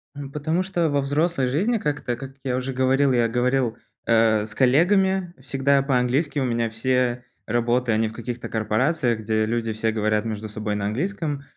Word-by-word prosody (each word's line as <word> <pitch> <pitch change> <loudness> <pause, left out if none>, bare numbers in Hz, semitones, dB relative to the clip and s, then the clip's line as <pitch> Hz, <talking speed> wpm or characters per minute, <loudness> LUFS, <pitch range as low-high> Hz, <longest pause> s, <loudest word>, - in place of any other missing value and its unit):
М, 140 -1 -7
потому 155 +5 -1
что 175 -4 0
во 145 -1 +1
взрослой 145 0 0
жизни 195 - +1
как-то, 150 - -2
как 135 +2 -9
я 130 -2 -1
уже 130 +1 -3
говорил, 130 +2 +2
я 120 -2 +3
говорил, 125 0 0 0.3
э, 110 -2 +3
с 105 - -9
коллегами 180 +7 +3
всегда 135 +1 +1
по-английски, 135 +3 +1
у 135 - 0
меня 115 -2 0
все 125 +2 0 0.2
работы, 120 +1 +1
они 110 0 +2
в 110 - -8
каких-то 120 +1 -6
корпорациях, 115 +3 0
где 110 0 0
люди 115 0 -1
все 110 +1 0
говорят 110 0 0
между 110 -1 -4
собой 105 0 -3
на 100 -1 -2
английском. 145 - -2
125 Hz, 175 wpm, -23 LUFS, 115-145 Hz, 0.3 s, я